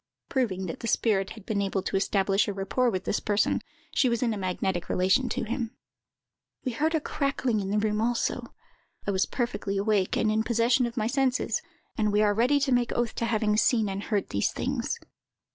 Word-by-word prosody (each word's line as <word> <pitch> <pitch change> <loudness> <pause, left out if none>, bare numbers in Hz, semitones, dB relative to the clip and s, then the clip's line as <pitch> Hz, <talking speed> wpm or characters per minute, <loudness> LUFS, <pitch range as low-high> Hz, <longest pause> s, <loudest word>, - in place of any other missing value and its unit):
[Proving 200 -8 0
that 165 - -5
the 230 - -4
spirit 200 -4 +2
had 210 - -12
been 205 -2 0
able 195 -1 -1
to - - -2
establish 195 0 +2
a 205 - -1
rapport 200 +6 +1
with 185 -5 -2
this - - 0
person. 205 0 +1 0.3
She 260 - +3
was 235 +1 0
in 230 -2 +1
a - - -4
magnetic 185 -1 -2
relation 190 +8 +2
to - - -2
him.] 235 +1 -3 0.9
We 255 - 0
heard 310 +7 0
a - - +3
crackling 275 -6 -1
in 195 -1 -3
the 205 - +1
room 210 0 +1
also. 235 +1 -1 0.5
I 200 - 0
was 190 -1 +1
perfectly 235 -5 -2
awake, 200 -2 +1
and 215 - +2
in 220 +1 +2
possession 235 +2 +2
of 235 +1 -9
my 215 - +1
senses; 260 +1 +1 0.4
and 210 -1 +2
we 210 +1 +3
are 205 -1 +3
ready 250 +7 +3
to 270 -1 +1
make 245 -1 +2
oath 240 -2 0
to 230 - -2
having 215 -2 +1
seen 225 -2 +3
and 195 +1 -3
heard 205 -1 -1
these 100 - 0
things." - - -2
215 Hz, 210 wpm, -27 LUFS, 200-240 Hz, 0.9 s, She